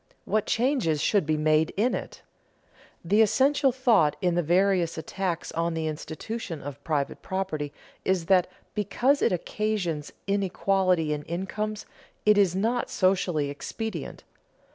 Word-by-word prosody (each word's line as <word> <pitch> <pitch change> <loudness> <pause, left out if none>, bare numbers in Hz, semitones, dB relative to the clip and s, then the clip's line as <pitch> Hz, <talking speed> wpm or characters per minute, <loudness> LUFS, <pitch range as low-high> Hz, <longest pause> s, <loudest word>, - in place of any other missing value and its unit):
What 215 -1 0
changes 235 - +1
should 190 +1 +2
be 155 -1 +1
made 155 +1 +2
in 235 +5 +2
it? - - -6 0.8
The 205 +6 +4
essential 265 +6 +3
thought 225 - +3
in 180 +1 +1
the 175 - +2
various 175 0 +2
attacks 175 +1 -3
on 165 0 -1
the 160 -1 -2
institution 160 +4 -5
of 140 -1 -8
private 145 -4 -2
property 170 -7 -3 0.3
is 185 -3 +1
that, 185 0 +4 0.3
because 240 +7 +1
it - - +3
occasions 180 -4 -2
inequality 190 -4 +1
in 150 - -3
incomes, 210 +5 -3 0.4
it 210 -1 +5
is 185 -3 +3
not 230 +5 0
socially 180 -6 +1
expedient. 185 +4 -6
185 Hz, 135 wpm, -27 LUFS, 160-215 Hz, 0.8 s, it